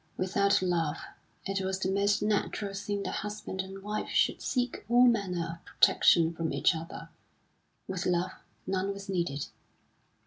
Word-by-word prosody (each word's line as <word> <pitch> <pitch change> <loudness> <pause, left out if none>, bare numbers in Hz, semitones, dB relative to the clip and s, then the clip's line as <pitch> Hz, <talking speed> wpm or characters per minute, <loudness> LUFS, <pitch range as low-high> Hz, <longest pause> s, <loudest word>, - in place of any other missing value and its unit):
Without 200 +1 +2
love 170 -4 0 0.5
it 195 0 -1
was 190 0 -1
the 190 0 -1
most 200 +1 +2
natural 205 -1 -1
thing 200 0 -3
that - - -3
husband 210 -2 -4
and 195 +1 -9
wife 210 +1 -3
should - - +2
seek 250 -2 -1
all 245 +1 +6
manner 180 -8 0
of - - -31
protection 165 -1 +4
from 165 -1 -2
each - - +3
other; 160 +1 -7 0.8
with 185 0 -3
love 180 0 +1 0.3
none 190 +1 -1
was 200 0 -9
needed. 170 -7 -1
190 Hz, 150 wpm, -30 LUFS, 175-205 Hz, 0.8 s, all